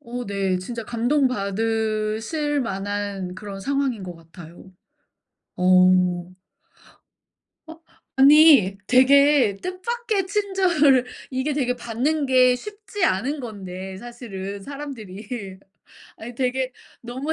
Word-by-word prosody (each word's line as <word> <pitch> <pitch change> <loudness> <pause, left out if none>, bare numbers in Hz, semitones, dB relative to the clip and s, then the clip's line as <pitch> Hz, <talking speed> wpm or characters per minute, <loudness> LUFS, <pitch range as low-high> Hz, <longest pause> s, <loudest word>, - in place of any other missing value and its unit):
어 245 -2 -6
네. 195 -2 -1
진짜 230 +5 -6
감동받으실 225 +2 -1
만한 200 -3 -4
그런 195 0 -8
상황인 275 -2 -1
것 180 -2 -7
같아요. 165 +2 -14 0.8
어. 180 -1 +3 1.3
어? 325 0 -12 0.4
아니 275 - +7
되게 265 -3 +5
뜻밖의 410 +2 -2
친절을 370 - +2 0.2
이게 260 +3 -2
되게 250 -3 0
받는 255 +6 -1
게 255 -1 +5
쉽지 415 - -5
않은 255 +11 0
건데 190 -5 -7
사실은 200 -4 -8
사람들이. 220 -7 -8 0.6
아니 240 +2 -9
되게 255 +1 -1 0.3
너무 260 +6 -4
240 Hz, 200 characters per minute, -23 LUFS, 195-280 Hz, 1.3 s, 아니